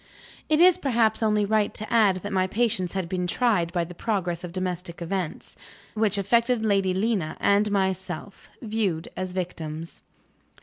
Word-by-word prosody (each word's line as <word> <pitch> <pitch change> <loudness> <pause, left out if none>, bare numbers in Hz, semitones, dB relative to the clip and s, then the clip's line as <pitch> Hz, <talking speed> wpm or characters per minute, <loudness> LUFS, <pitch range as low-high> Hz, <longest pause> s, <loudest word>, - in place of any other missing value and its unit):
It 310 0 +3
is 360 +1 +6
perhaps 230 -7 +1
only 210 -2 +2
right 215 0 +1
to 215 - -5
add 200 -6 +4
that 205 - -4
my 185 -1 +2
patience 200 -5 0
had 190 -3 -2
been 180 0 -2
tried 185 -5 +1
by 175 -1 0
the 175 +1 -8
progress 180 -4 -2
of 175 - -6
domestic 180 -1 -4
events, 175 -1 -4 0.4
which 215 -2 +1
affected 230 +3 +2
Lady 195 -3 +2
Lena 195 -6 -1
and 205 +1 +3
myself 190 -1 -3
viewed 210 -7 -1
as 185 -1 -4
victims. 165 -3 -5
195 Hz, 160 wpm, -25 LUFS, 180-220 Hz, 0.4 s, is